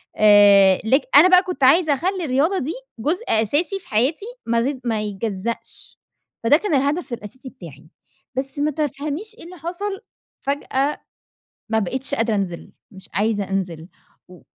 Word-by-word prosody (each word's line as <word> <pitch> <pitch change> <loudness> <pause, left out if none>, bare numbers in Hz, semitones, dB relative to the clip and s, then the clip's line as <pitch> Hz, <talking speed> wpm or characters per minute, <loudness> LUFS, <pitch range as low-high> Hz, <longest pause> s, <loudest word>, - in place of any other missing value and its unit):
آآ، 200 -2 +6
لك 265 +6 +3
أنا 370 - +9
بقى 365 0 +6
كنت 360 -6 -4
عايزة 310 +3 +5
أخلي 365 +5 -2
الرياضة 300 +8 +1
دي 300 +6 -3 0.3
جزء 330 - 0
أساسي 290 - 0
في 360 - -18
حياتي 260 - 0 0.2
ما 230 0 +1
تت 260 -2 -10
ما 225 -3 0
يتجزأش. 210 +1 -5 0.5
فده 260 +6 +5
كان 380 -2 -3
الهدف 285 +1 -1
الأساسي 240 +4 -8
بتاعي. 155 - -13 0.5
بس 270 +2 -3
ما 300 +1 +1
تفهميش 305 - -4
إيه 465 - -12
اللي 365 +1 -11
حصل، 385 +4 -5 0.4
فجأة 280 0 -2 0.7
ما 220 0 +2
بقيتش 260 +8 -2
قادرة 230 -3 0
أنزل، 185 -4 -4 0.2
مش 190 -2 -14
عايزة 205 +1 0
أنزل. 175 -4 -3 0.4
و 180 -1 -15
265 Hz, 155 wpm, -21 LUFS, 210-315 Hz, 0.7 s, أنا